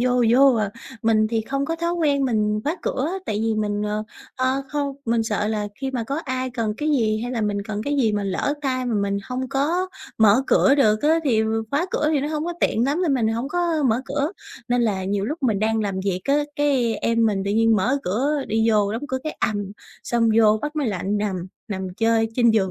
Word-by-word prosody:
vô 250 -1 +2
vô 265 +1 +6
à. 210 -3 0 0.3
Mình 215 -1 +3
thì 225 -1 0
không 275 +5 -2
có 330 +2 -2
thói 340 +1 -1
quen 290 -5 +1
mình 210 -3 +1
khóa 315 +5 -1
cửa 275 +4 -1 0.2
tại 210 -1 -1
vì 225 -1 +1
mình, 210 -1 -1
ờ, 210 +1 -2 0.3
ơ, 260 +1 0
không 285 -1 -2
mình 230 -1 +1
sợ 210 -1 -1
là 210 -1 -2
khi 270 0 -2
mà 245 -4 -2
có 280 +6 -3
ai 255 -1 -2
cần 225 -4 -2
cái 305 - -2
gì 220 -6 +1
hay 245 +1 -3
là 230 - -1
mình 205 -1 -1
cần 215 -1 -4
cái 290 0 -1
gì 225 -6 +2
mà 205 -1 -1
lỡ 195 +9 -1
tay 255 -2 -1
mà 235 - -1
mình 200 -1 0
hông 255 0 -3
có 325 +7 0 0.3
mở 220 +4 +5
cửa 275 - +4
được 215 -5 +3
á 320 +2 +4
thì 225 -5 +3 0.3
khóa 305 +6 +1
cửa 300 - +1
thì 285 - +2
nó 290 - -2
hông 310 0 -2
có 345 - -2
tiện 230 +2 +2
lắm 300 +7 0
nên 295 -6 +2
mình 230 -4 +1
hổng 230 +5 -2
có 340 -2 0
mở 235 +4 +1
cửa. 290 +5 -2 0.4
Nên 245 0 +2
là 195 -4 0
nhiều 200 +1 -1
lúc 300 +5 -4
mình 220 -6 +2
đang 220 +1 +1
làm 195 -2 -2
việc 185 -2 -1
á, 280 - +2 0.2
cái 265 -6 +2
em 230 +1 +1
mình 195 -3 0
tự 200 - -1
nhiên 225 +1 +3
mở 250 +9 +1
cửa 270 +9 0
đi 220 +1 +2
vô 205 -1 +2
đóng 230 +5 -4
cửa 260 - -1
cái 310 - -4
ầm, 205 -2 -1 0.3
xong 235 -1 +1
vô 215 -1 +5
bắt 300 +1 -4
máy 280 -6 0
lạnh 200 +1 -1
nằm, 190 -4 -2 0.2
nằm 190 -2 -3
chơi 225 0 +2
trên 240 -2 +4
giường 200 -4 +2
230 Hz, 245 wpm, -23 LUFS, 210-275 Hz, 0.4 s, vô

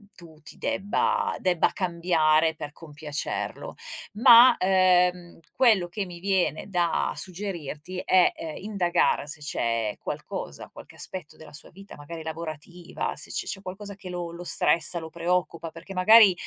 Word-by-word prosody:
tu 165 -3 -14
ti 150 - -11
debba 460 - 0
debba 180 -3 +2
cambiare 165 -3 +2
per 145 -1 -7
compiacerlo. 150 -1 -5 0.4
Ma 240 +2 +8
ehm 180 -2 +2 0.2
quello 220 -9 +4
che 195 +3 -4
mi 175 -2 -10
viene 185 -3 0
da 175 -3 0
suggerirti 180 -3 -6
è 185 -1 +5
ehm, 160 -2 -7
indagare 190 -7 +1
se 150 +1 -7
c'è 115 -7 -2
qualcosa, - - -6
qualche - - -13
aspetto 185 -5 -6
della 155 -1 -14
sua 150 - -11
vita, 195 +2 -13
magari 160 +3 -8
lavorativa, 160 +2 -6
se - - -5
c - - -3
c'è 195 - -5
qualcosa 200 +2 -7
che 185 -2 -10
lo 175 -1 -4
lo 175 +1 -8
stressa, 170 0 +1
lo 160 0 -8
preoccupa, 170 -1 -2
perché 170 +4 -10
magari 205 +1 +7
175 Hz, 145 wpm, -26 LUFS, 160-190 Hz, 0.4 s, Ma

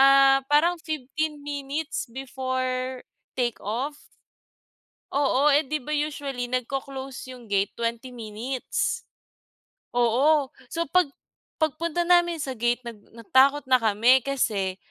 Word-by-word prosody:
ah, 275 0 +7
parang 315 +5 +4
15 305 0 -3
minutes 285 -1 -3
before 255 0 -3 0.4
take 240 -2 0
off. 255 +8 -3 1.2
Oo, 280 +1 +3
eh, 290 +1 +4
'di 305 0 -2
ba 300 - -6
usually 285 -4 -2
nagco-close 265 +1 -4
yung 240 -2 -14
gate 200 0 +1
20 235 +2 -3
minutes. 240 - -3 1.0
Oo. 265 +4 +3 0.2
So 335 0 -1
pag 365 -3 +5 0.5
pagpunta 320 +2 0
namin 345 -1 +4
sa 270 -2 -3
gate 240 +2 +1
nag 230 -3 -7 0.2
natakot 270 +5 +4
na 255 - +7
kami 230 +4 +5
kasi 205 -9 0
265 Hz, 115 wpm, -26 LUFS, 245-295 Hz, 1.2 s, ah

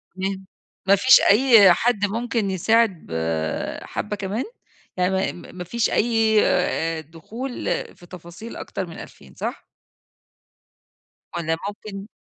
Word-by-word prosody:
تمام. 190 0 -3 0.4
ما 200 +1 +6
فيش 255 +7 +7
أي 215 -4 +7
حد 230 -2 +1
ممكن 225 0 -1
يساعد 210 0 +2
بحَبّة 80 - -3
كمان؟ 205 +4 -3 0.5
يعني 180 +1 +1
ما 190 - 0 0.2
م - - -17
ما 180 - -4
فيش 230 +6 -1
أي 225 -1 +3
آآ 165 -2 0
دخول 215 - -8 0.4
في 175 - -16
تفاصيل 175 +5 -10
أكتر 190 - -5
من 165 - -10
2000 65 - -13
صح؟ - - -5 1.7
والّا 165 -1 -1
ممكن 205 -1 -8
195 Hz, 125 wpm, -23 LUFS, 170-225 Hz, 1.7 s, فيش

